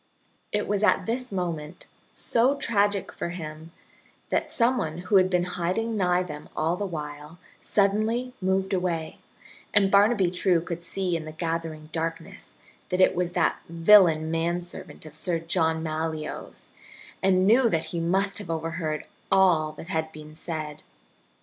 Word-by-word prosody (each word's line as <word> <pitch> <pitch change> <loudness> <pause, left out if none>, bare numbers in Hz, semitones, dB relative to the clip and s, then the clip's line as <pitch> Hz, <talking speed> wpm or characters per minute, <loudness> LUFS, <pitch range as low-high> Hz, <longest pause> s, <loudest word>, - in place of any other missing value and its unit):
It 210 0 0
was 205 0 0
at 215 - +3
this 250 +2 -3
moment, 170 -5 -4 0.3
so 245 +4 +4
tragic 205 -6 +1
for - - -4
him, 160 -2 -7 0.6
that - - 0
some 245 +2 +2
one 155 0 -3
who 185 +3 +2
had 185 0 +4
been 180 -1 +2
hiding 180 +6 -2
nigh 180 -2 +2
them 150 -4 -8
all 160 +3 +1
the 200 +2 -3
while 150 -1 -7 0.2
suddenly 215 +5 +1
moved 190 +1 0
away, 175 -4 -2 0.6
and 195 -1 +4
Barnaby 200 -2 +4
True 180 -1 +2
could 170 0 -5
see 180 0 -2
in 160 -2 -4
the 155 - -7
gathering 165 -1 -4
darkness 165 0 -5 0.4
that 180 - -1
it 185 - +5
was 175 0 -1
that 175 - +1
villain 165 -2 +5
manservant 170 +1 -3
of 155 - -11
Sir 165 +2 0
John 160 -1 0
Malyoe's 155 -1 -5 0.5
and 185 -1 +3
knew 235 +4 +5
that 165 -4 0
he 170 - -1
must 190 +5 0
have 200 -5 -9
overheard 165 -1 -3 0.3
all 170 -5 +4
that 165 - -10
had 160 -3 -2
been 155 -1 -11
said. 155 -2 -6
175 Hz, 155 wpm, -26 LUFS, 160-195 Hz, 0.6 s, it